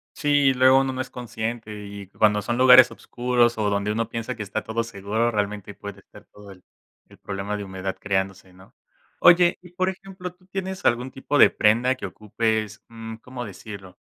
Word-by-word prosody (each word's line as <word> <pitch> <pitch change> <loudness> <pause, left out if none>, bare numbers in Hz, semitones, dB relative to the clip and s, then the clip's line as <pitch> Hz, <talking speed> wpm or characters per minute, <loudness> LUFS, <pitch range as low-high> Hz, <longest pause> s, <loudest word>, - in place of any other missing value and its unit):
Sí, 145 -3 +3
luego 130 +1 +5
uno 135 0 0
no 130 - -6
es 130 - -6
consciente 110 -3 -6
y 100 -1 -9
que 100 - -28
cuando 105 -1 +3
son 120 +4 -2
lugares 130 -1 +8
oscuros 120 0 0
o 105 -1 +1
donde 100 +1 -1
uno 115 +1 -2
piensa 115 +2 -4
que 110 - -5
está 105 +2 -3
todo 110 +2 -2
seguro, 110 +1 -1
realmente 105 -1 -3
puede 100 0 -9
estar - - -17
todo 105 -1 -15
el 90 -2 -16 0.5
el - - -17
problema 100 +1 -4
de 100 - -6
humedad 95 0 -5
creándose, 95 -2 -2
¿no?, 95 +1 -19 0.5
oye, 175 0 +6
y 180 -1 -15
por 185 +1 0
ejemplo, 185 -1 -8
¿tú 185 0 -28
tienes 190 0 -5
algún 125 +2 +1
tipo 135 +3 -2
de - - +8
prenda 120 +4 +2
que 130 - -7
ocupes, 110 0 -2
mm, 115 -1 -8
¿cómo 125 +2 -8
decirlo?, 100 -2 -10
115 Hz, 195 wpm, -24 LUFS, 100-130 Hz, 0.5 s, lugares